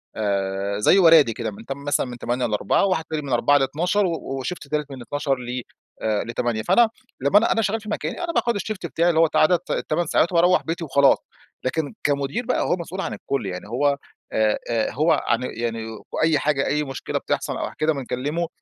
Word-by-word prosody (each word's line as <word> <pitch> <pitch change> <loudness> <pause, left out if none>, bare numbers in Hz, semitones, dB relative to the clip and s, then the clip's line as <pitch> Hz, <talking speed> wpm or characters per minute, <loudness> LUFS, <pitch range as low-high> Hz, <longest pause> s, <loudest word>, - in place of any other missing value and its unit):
آآ، 100 -1 -1
زي 105 - +5
ورادي 160 -9 +6
كده 115 -1 -4
من 105 +3 -12
تم 140 +1 -6
مثلًا 145 -1 +1
من 120 -1 -7
8:00 120 +2 -1
ل16:00 105 - +1
وواحد 185 -5 +1
تاني 155 -1 -2
من 135 -3 -4
16:00 145 +4 +4
ل00:00 175 +9 +1
و - - +1 0.3
وشيفت 150 +1 -5
تالت 150 -1 -2
من 130 -2 -8
12:00 140 +2 -1
ل 125 0 -4 0.6
ل8:00، 115 -1 -2
فأنا 230 - +4 0.3
لمّا 140 +9 +4
أنا 225 - +4
أنا 225 - +2
شغّال 220 +1 -1
في 215 - -9
مكاني 345 - -3
أنا 335 -1 -2
باخد 235 -2 +1
الشيفت 205 -2 -4
بتاعي 170 +1 +1
اللي 160 - +2
هو 165 -1 +5
عدد 170 +2 +5
ال8 170 +2 -1
ساعات 170 +3 +2
وباروّح 175 +1 +4
بيتي 165 +1 -3
وخلاص، 140 -1 +4 0.5
لكن 155 - -1
كمدير 140 - 0
بقى 255 - 0
هو - - +1
مسؤول 180 +3 -5
عن - - -3
الكُلّ، 135 -6 -3
يعني 90 -1 -5
هو، 140 +3 +1 0.3
آآ، 110 -1 +2
آآ، 115 -2 0
هو 155 +5 +2 0.2
عن 120 - +2
يعني 115 -2 -3 0.3
وأيّ 155 -2 +2
حاجة 140 -2 +1
أيّ 150 +1 +1
مشكلة 135 -2 -4
بتحصل - - -2
أو - - -3
ح - - -14
كده 155 0 +2
بنكلّمه. 140 +5 -2
145 Hz, 205 wpm, -23 LUFS, 120-170 Hz, 0.6 s, ورادي